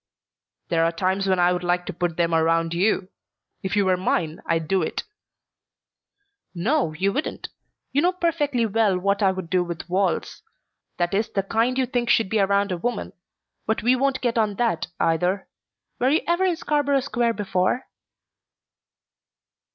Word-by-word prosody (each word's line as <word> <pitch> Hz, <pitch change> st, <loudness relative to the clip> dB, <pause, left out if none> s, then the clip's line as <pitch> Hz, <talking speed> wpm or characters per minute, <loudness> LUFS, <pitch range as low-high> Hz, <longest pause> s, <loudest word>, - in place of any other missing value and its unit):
"There 165 Hz, -1 st, +2 dB
are 165 Hz, -, +2 dB
times 190 Hz, +3 st, -1 dB
when 190 Hz, -1 st, +2 dB
I 175 Hz, 0 st, +4 dB
would 180 Hz, 0 st, -3 dB
like 175 Hz, 0 st, 0 dB
to 190 Hz, -, -5 dB
put 170 Hz, -1 st, -2 dB
them 170 Hz, -1 st, +1 dB
around 165 Hz, +1 st, +2 dB
you! 185 Hz, +1 st, +1 dB, 0.5 s
If 190 Hz, -, -2 dB
you 205 Hz, -1 st, +3 dB
were 185 Hz, -1 st, +3 dB
mine 165 Hz, -3 st, -1 dB
I'd 165 Hz, -1 st, 0 dB
do 190 Hz, +2 st, +2 dB
it." 160 Hz, -, -2 dB, 1.5 s
"No, 220 Hz, -, +1 dB
you 195 Hz, +5 st, 0 dB
wouldn't. 295 Hz, -, -3 dB, 0.4 s
You 285 Hz, -, +2 dB
know 355 Hz, +3 st, +3 dB
perfectly 300 Hz, -9 st, 0 dB
well 215 Hz, -3 st, +2 dB
what 200 Hz, +3 st, 0 dB
I 195 Hz, -2 st, +4 dB
would 185 Hz, -2 st, -5 dB
do 180 Hz, +1 st, +1 dB
with 170 Hz, -1 st, -6 dB
walls. 190 Hz, +2 st, -1 dB, 0.6 s
That 175 Hz, +1 st, 0 dB
is 215 Hz, +3 st, +1 dB
the 195 Hz, -, -1 dB
kind 230 Hz, +5 st, 0 dB
you 260 Hz, -, +2 dB
think 245 Hz, -1 st, -1 dB
should 225 Hz, -4 st, +3 dB
be 220 Hz, -, +1 dB
around 200 Hz, 0 st, +2 dB
a 180 Hz, -, -1 dB
woman. 240 Hz, +7 st, -3 dB, 0.5 s
But 220 Hz, 0 st, 0 dB
we 245 Hz, +2 st, +4 dB
won't 270 Hz, +1 st, 0 dB
get 240 Hz, -2 st, +1 dB
on 210 Hz, -2 st, +1 dB
that, 230 Hz, -6 st, 0 dB
either. 180 Hz, +4 st, +1 dB, 0.5 s
Were 255 Hz, -, +3 dB
you 310 Hz, +4 st, +3 dB
ever 345 Hz, +3 st, +2 dB
in 360 Hz, -2 st, +2 dB
Scarborough 290 Hz, -3 st, +1 dB
Square 240 Hz, -3 st, 0 dB
before?" 200 Hz, +3 st, 0 dB
195 Hz, 175 wpm, -24 LUFS, 180-245 Hz, 1.5 s, I